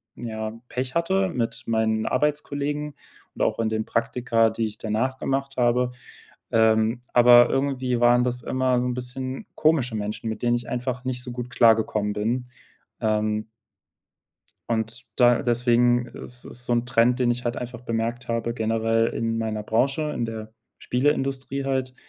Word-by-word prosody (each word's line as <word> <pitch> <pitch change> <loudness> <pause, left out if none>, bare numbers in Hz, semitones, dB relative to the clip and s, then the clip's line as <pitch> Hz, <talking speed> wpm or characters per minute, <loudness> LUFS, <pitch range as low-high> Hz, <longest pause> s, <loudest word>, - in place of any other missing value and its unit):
ja, 110 -2 -5 0.2
Pech 125 0 -3
hatte 190 +3 +1
mit 120 -8 -3
meinen 110 -1 +1
Arbeitskollegen 145 +1 -1 0.4
und - - -6
auch - - +1
in 115 - +1
den 110 0 -1
Praktika, 115 -1 +1
die 115 0 -1
ich 105 -1 -6
danach 115 +5 -1
gemacht 135 +1 -2
habe. 125 0 +2 0.6
Ähm, 110 +1 +3
aber 120 0 +7
irgendwie 130 -3 0
waren 120 0 +5
das 125 0 -2
immer 130 -1 +1
so 125 - -1
'n 125 - -1
bisschen 130 +1 -5
komische 140 -7 +2
Menschen, 105 +2 -3
mit 110 - -5
denen 120 0 +3
ich 120 0 -4
einfach 125 0 -3
nicht 125 -1 -2
so 125 - -6
gut 125 0 -5
klargekommen 110 -3 +3
bin. 120 +5 -1 0.5
Ähm 110 0 0 1.2
und 115 +1 -2
da 120 -2 +5
deswegen 120 0 +3
ist 125 +1 -8
es 120 - -6
so - - 0
'n 120 0 +1
Trend, 120 +1 +3
den 120 -1 +2
ich 120 +1 -2
halt 120 0 -1
einfach 120 -1 -6
bemerkt 115 +1 -3
habe, 115 0 -1
generell 115 0 +1
in 115 0 -2
meiner 110 -1 -2
Branche, 140 +8 0
in 120 - -2
der 110 -1 -6 0.3
Spieleindustrie 135 0 -1
halt, 130 -1 -1
120 Hz, 160 wpm, -24 LUFS, 115-130 Hz, 1.2 s, aber